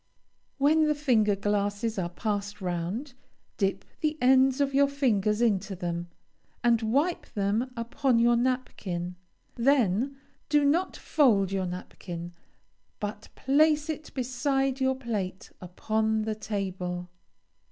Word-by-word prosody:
When 305 +3 +4
the 300 - +2
finger 230 -8 +2
glasses 205 +2 -1
are 175 -2 -2
passed 205 +2 -3
round, 185 - -3 0.4
dip 195 -2 0
the 310 -1 0
ends 260 +1 +4
of 275 -1 +1
your 280 +1 +5
fingers 230 -6 +1
into 200 -3 +1
them, 175 -1 -3 0.6
and 235 -1 +4
wipe 280 +11 0
them 210 +5 -1
upon 235 +2 +1
your 235 +1 +4
napkin; 210 -8 -2 0.4
then 250 0 +2 0.3
do 295 -1 +4
not 335 +6 +1
fold 210 - +3
your 190 -2 -1
napkin, 175 -1 -7 0.7
but 210 +1 -5
place 300 +3 +3
it 310 0 -8
beside 270 +1 0
your 265 0 +2
plate 210 -8 -4
upon 220 +4 -1
the 220 0 -1
table. 185 -4 -4
225 Hz, 120 wpm, -28 LUFS, 195-270 Hz, 0.7 s, your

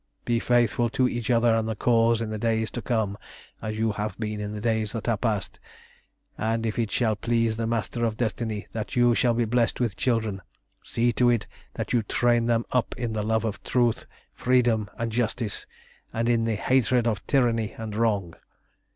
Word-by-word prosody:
Be 120 -1 +1
faithful 120 -1 +2
to 130 - +4
each 120 -1 -3
other 115 -1 +4
and 110 0 0
the 110 - -2
Cause 115 0 +3
in 110 -1 -3
the 110 - -3
days 110 0 0
to 120 - -4
come 110 -5 -1 0.4
as 110 -1 -4
you 110 0 +1
have 105 +1 -4
been 105 -1 -3
in 105 0 -4
the 105 - -5
days 110 -1 0
that 115 - -4
are 115 - +3
past, 105 -3 -2 0.8
and 115 +1 0
if 110 +1 -2
it 115 -2 0
shall 110 -3 +1
please 115 +1 0
the 115 0 -2
Master 115 +1 -2
of 110 -2 0
Destiny 110 -2 -2
that 110 -2 -5
you 120 -1 +5
shall 120 0 +2
be 120 0 +1
blessed 115 +1 +1
with 120 -5 0
children, 110 -6 0 0.4
see 120 +1 +1
to 120 +2 +3
it 120 -3 +1 0.3
that - - -3
you 120 - +4
train 120 +2 +2
them 115 -1 +1
up 125 -2 0
in 120 -2 -2
the 110 - -1
love 110 +1 0
of 105 -3 -3
truth, 120 -3 +1 0.3
freedom, 120 -4 +2
and 115 0 -2
justice, 115 -1 -2 0.4
and 115 +1 -1
in 115 -1 +2
the 115 -1 0
hatred 125 +1 +2
of 110 -4 -1
tyranny 115 -5 +2
and 110 -2 -5
wrong. 105 -6 0
115 Hz, 200 wpm, -26 LUFS, 110-120 Hz, 0.8 s, you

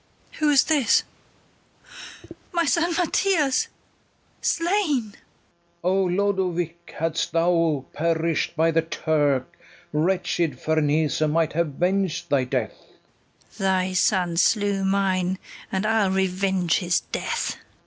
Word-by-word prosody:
Who 305 -1 +3
is 280 -3 +5
this? 290 -7 +3 1.5
my 340 -2 +1
son 335 +2 +1
Mathias 345 -5 +1 0.7
slain! 330 - 0
FERNEZE. - - -20 0.7
O 180 +2 +2
Lodowick, 180 -3 -1
hadst 165 0 -1
thou 165 -4 +2
perish'd 165 0 0
by 165 +1 +3
the 165 0 +2
Turk, 150 -5 0 0.4
Wretched 170 -3 0
Ferneze 155 -1 +1
might 160 +1 +1
have 155 -3 -1
veng'd 185 -2 0
thy 140 -3 +2
death! 125 -3 -2 0.8
KATHARINE. 200 - -19 0.3
Thy - - -6
son 180 -2 +1
slew 200 0 +2
mine, 190 -1 +1 0.3
and 190 +2 -1
I'll 220 -3 +2
revenge 190 -2 +1
his 175 -2 +1
death. - - -3
180 Hz, 110 wpm, -24 LUFS, 160-200 Hz, 1.5 s, is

